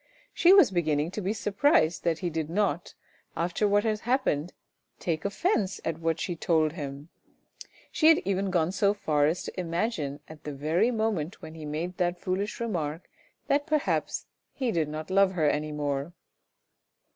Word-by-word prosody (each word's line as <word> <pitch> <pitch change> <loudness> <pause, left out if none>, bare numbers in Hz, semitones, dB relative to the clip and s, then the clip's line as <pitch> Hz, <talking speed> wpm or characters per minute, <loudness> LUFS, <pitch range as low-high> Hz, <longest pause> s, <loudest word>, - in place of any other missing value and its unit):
She 350 - +5
was 385 - +7
beginning 155 -3 0
to 210 - -4
be 190 +1 -1
surprised 205 - +2
that 165 -2 +2
he 175 - 0
did 160 -1 -3
not, 180 -3 -1 0.4
after 175 +5 +1
what 205 0 +3
had 215 -1 0
happened, 220 - 0 0.5
take 160 -1 -2
offence 200 - 0
at 165 0 -2
what 165 0 0
she 175 - -2
told 160 -2 +2
him. 145 -1 -7 0.8
She 315 - +3
had 325 -1 +8
even 195 0 0
gone 175 -2 +1
so 200 +1 +2
far 150 -7 +2
as 165 +4 -1
to - - -6
imagine 170 -5 -2
at 155 -1 -12
the 150 - -5
very 160 - +1
moment 215 -8 -2
when 160 0 -8
he 160 -1 -8
made 165 +5 -4
that 175 -1 0
foolish 195 +4 -2
remark 170 -8 -3 0.3
that 290 +2 +1
perhaps 305 -2 0 0.3
he 255 -4 -1
did 160 -5 0
not 155 +3 -6
love 195 0 +4
her 160 -4 +2
any 150 +1 0
more. 145 +1 -2
175 Hz, 170 wpm, -28 LUFS, 155-205 Hz, 0.8 s, had